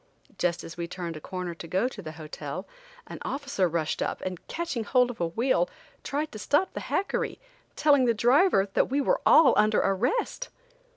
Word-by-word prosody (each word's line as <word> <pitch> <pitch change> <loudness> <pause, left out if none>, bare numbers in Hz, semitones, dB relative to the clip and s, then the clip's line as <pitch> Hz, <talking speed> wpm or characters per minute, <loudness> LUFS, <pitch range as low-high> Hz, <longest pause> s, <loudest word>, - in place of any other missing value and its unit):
Just 175 -1 0
as 165 - -9
we 170 -1 -3
turned 170 -2 -5
a 155 - -8
corner 180 -1 -5
to 165 0 -9
go 190 +8 +1
to 240 -5 -8
the 155 -4 -7
hotel, 155 -1 -7 0.4
an - - -9
officer 275 -8 -1
rushed 160 -1 -1
up - - -2
and, 185 -2 -6
catching 330 -9 -3
hold 250 +2 +3
of 225 - -10
a 170 - +2
wheel, 250 - +1 0.3
tried 300 +2 -2
to 215 - -8
stop 295 - +1
the - - -4
hackery, 395 - -1 0.4
telling 285 -4 +4
the 235 - +3
driver 245 - +4
that - - +2
we 275 +2 +1
were - - +1
all 315 -4 +7
under 215 0 +4
arrest. 455 - 0
220 Hz, 190 wpm, -27 LUFS, 175-285 Hz, 0.4 s, all